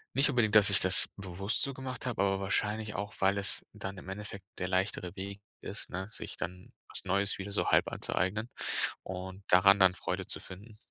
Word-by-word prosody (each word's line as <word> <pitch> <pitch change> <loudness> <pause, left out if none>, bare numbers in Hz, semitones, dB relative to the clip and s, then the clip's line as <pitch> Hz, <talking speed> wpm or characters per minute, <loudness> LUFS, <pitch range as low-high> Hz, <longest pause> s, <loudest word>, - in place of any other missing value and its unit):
Nicht 140 +2 +5
unbedingt, 110 -5 +2
dass 105 -1 +7
ich 100 - +8
das 95 0 +4
bewusst 95 +2 0
so 140 - +1
gemacht 130 -1 -6
habe, 125 -5 -1
aber 95 0 +1
wahrscheinlich 105 +2 -1
auch, 105 +2 -4
weil 95 +1 +2
es 100 - +2
dann 100 -2 -6
im 95 - -10
Endeffekt 100 -1 -7
der 90 - -2
leichtere 95 -1 -1
Weg 100 +1 -7 0.2
ist, - - -5
ne, 95 +2 -5
sich - - -7
dann 90 +1 -7 0.2
was - - -2
Neues 100 +1 +1
wieder 100 +1 -6
so 100 - 0
halb - - +3
anzueignen 105 +6 -1 0.6
und 95 +1 -7
daran 100 +2 +6
dann 95 -2 +5
Freude - - -3
zu - - -1
finden. 105 +4 -12
100 Hz, 200 wpm, -31 LUFS, 95-105 Hz, 0.6 s, ich